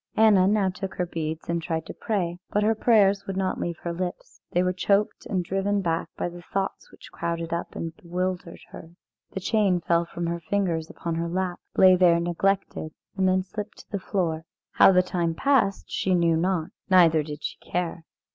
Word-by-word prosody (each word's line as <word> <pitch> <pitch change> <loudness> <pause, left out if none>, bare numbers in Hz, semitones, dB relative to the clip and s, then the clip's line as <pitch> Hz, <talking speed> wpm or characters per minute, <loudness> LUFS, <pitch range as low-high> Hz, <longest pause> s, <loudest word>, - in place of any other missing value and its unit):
Anna 210 -4 +6
now 200 -2 +2
took 190 +1 -6
her 180 - -1
beads 160 -2 -4
and 170 0 -1
tried 160 -1 -3
to - - -7
pray, 180 -6 -2
but 210 - +1
her 220 +1 +3
prayers 210 -3 +3
would 195 -1 -3
not 190 -1 -1
leave 170 -1 -3
her 170 - -2
lips; 180 +1 -6
they 180 - +1
were 180 0 +1
choked 200 +3 0
and 185 -3 -1
driven 195 +3 0
back 165 -3 -1
by - - -1
the 175 0 -9
thoughts 195 +3 -4
which - - -15
crowded 170 0 -3
up 170 - -4
and 165 -1 -5
bewildered 180 -2 -4
her. 165 +1 -11 0.4
The - - -3
chain 195 -2 +2
fell 170 0 +1
from 170 0 -5
her 170 0 -2
fingers 170 -3 -1
upon 170 - -4
her 165 +1 -2
lap, 180 0 -2 0.2
lay 185 -1 +8
there 175 -2 +5
neglected, 175 -2 -1 0.2
and 190 -1 +2
then 185 0 +2
slipped 210 +3 -7
to - - -26
the 200 - -2
floor. 165 -4 -2 0.3
How - - +7
the 180 -1 +4
time 170 -2 -1
passed 250 -5 +2
she 185 -1 +1
knew 170 -2 +3
not, 170 -1 0 0.2
neither 170 -4 +6
did 150 0 -7
she - - -4
care. 175 -1 -3
180 Hz, 200 wpm, -25 LUFS, 170-195 Hz, 0.4 s, lay